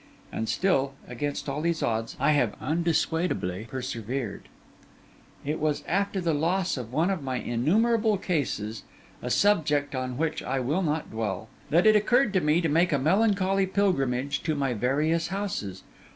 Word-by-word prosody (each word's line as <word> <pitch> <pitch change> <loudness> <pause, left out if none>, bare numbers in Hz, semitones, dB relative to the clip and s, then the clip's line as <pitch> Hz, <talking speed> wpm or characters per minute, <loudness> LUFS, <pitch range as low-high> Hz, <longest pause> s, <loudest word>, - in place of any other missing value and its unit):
And 110 - -3
still, 140 -8 +1
against 145 +5 -4
all 140 +2 -2
these 170 0 0
odds, 115 0 -2
I - - +3
have 125 -8 +1
undissuadably 160 - -1
persevered. 120 -2 -4 1.0
It 150 +3 -2
was 150 -1 0
after 200 +2 0
the 170 -3 0
loss 175 +5 0
of 125 -4 -6
one 165 +8 +1
of 190 -5 -2
my 130 -2 -3
innumerable 210 - +2
cases 130 - -2 0.4
(a 125 - -4
subject 150 -5 +2
on 130 -1 -3
which 160 +1 -1
I 135 - -2
will 145 +9 0
not 155 -2 -2
dwell) 110 0 -3 0.2
that 170 +6 +3
it 215 0 +7
occurred 235 +2 +3
to 190 - +3
me 150 +3 +3
to 165 - +1
make 165 +4 +3
a 145 - +3
melancholy 195 - +2
pilgrimage 140 -10 0
to 155 -2 -1
my 135 -3 0
various 150 +8 +1
houses. 180 - -4
150 Hz, 160 wpm, -27 LUFS, 130-185 Hz, 1.0 s, it